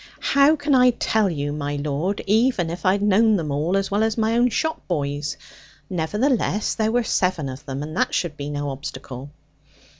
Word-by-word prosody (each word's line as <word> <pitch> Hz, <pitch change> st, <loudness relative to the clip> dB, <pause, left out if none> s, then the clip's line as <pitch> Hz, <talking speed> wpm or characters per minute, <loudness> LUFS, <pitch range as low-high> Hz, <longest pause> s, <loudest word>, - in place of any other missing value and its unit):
'How 280 Hz, +3 st, +4 dB
can 290 Hz, -1 st, -1 dB
I 250 Hz, -1 st, +6 dB
tell 220 Hz, -3 st, +1 dB
you, 145 Hz, -3 st, -3 dB
my 145 Hz, -1 st, -3 dB
lord, 150 Hz, +7 st, -2 dB
even 210 Hz, -5 st, +2 dB
if 170 Hz, +1 st, -3 dB
I 185 Hz, -, +5 dB
had 200 Hz, 0 st, -1 dB
known 210 Hz, +2 st, +4 dB
them 160 Hz, -6 st, -2 dB
all 155 Hz, +7 st, 0 dB
as 195 Hz, 0 st, -2 dB
well 205 Hz, +2 st, +1 dB
as 220 Hz, 0 st, 0 dB
my 225 Hz, 0 st, +1 dB
own 240 Hz, +1 st, +4 dB
shop 315 Hz, +8 st, -2 dB
boys? 145 Hz, -3 st, -2 dB, 0.5 s
Nevertheless 210 Hz, -, 0 dB
there 220 Hz, -1 st, 0 dB
were 245 Hz, +1 st, +2 dB
seven 180 Hz, -8 st, 0 dB
of 130 Hz, +2 st, -7 dB
them, 135 Hz, +1 st, -4 dB
and 155 Hz, +2 st, -7 dB
that -, -, +1 dB
should 170 Hz, -4 st, -1 dB
be 145 Hz, 0 st, -5 dB
no 145 Hz, -1 st, -3 dB
obstacle.' 135 Hz, -1 st, -7 dB
185 Hz, 200 wpm, -22 LUFS, 145-220 Hz, 0.5 s, I